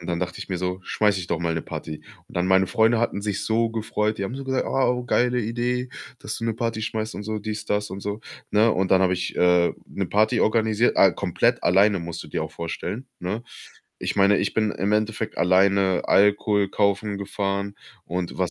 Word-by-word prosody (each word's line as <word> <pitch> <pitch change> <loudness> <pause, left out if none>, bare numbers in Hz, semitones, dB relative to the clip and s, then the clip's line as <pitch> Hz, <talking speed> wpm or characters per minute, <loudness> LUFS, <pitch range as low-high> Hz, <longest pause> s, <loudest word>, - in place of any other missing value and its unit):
Und 85 - -10
dann 85 - -1
dachte 90 0 -4
ich - - -7
mir 90 -2 -2
so: 90 +1 -3
„Schmeiße 105 -2 +1
ich 90 - -6
doch 85 - 0
mal 85 -1 -1
'ne 80 - -2
Party.“ 75 -1 -7 0.2
Und - - -11
dann 90 +1 +1
meine 95 0 +4
Freunde 110 +4 +3
hatten 115 -4 -1
sich 105 -1 -2
so 115 +1 +1
gefreut, 110 -1 -1
die 100 - -1
haben 115 - -4
so 135 0 -6
gesagt: 130 -1 -1
„Ah, 135 - +1
oh, 125 0 -2
geile 125 0 +2
Idee, 120 +3 -2 0.3
dass - - -5
du 115 - -5
'ne 115 - 0
Party 115 -1 -2
schmeißt 110 0 -3
und - - -5
so, 110 +1 -3
dies, 105 0 -5
das 105 0 -1
und 95 - -6
so“, 105 +2 -4 0.3
ne? 110 +2 +4
Und 95 0 0
dann 95 0 +5
habe 90 - +3
ich, 90 0 -4
äh, 90 -1 +4
'ne 95 -2 -4
Party 110 +5 +2
organisiert. 110 +1 +2
Äh, - - +6
komplett - - 0
alleine 100 +2 +4
musst 85 0 -6
du - - -11
dir 80 - -2
auch 80 - -5
vorstellen, 105 +9 -5
ne? 100 +6 -3 0.6
Ich - - -3
meine, 100 0 +4
ich - - -1
bin 110 -1 +1
im 100 +2 -1
Endeffekt 110 +1 -1
alleine 95 +1 +3
Alkohol 100 0 +3
kaufen 100 +1 0
gefahren 100 0 -3 0.3
und 90 +1 -4
was 90 -2 0
105 Hz, 225 wpm, -24 LUFS, 95-110 Hz, 0.6 s, Äh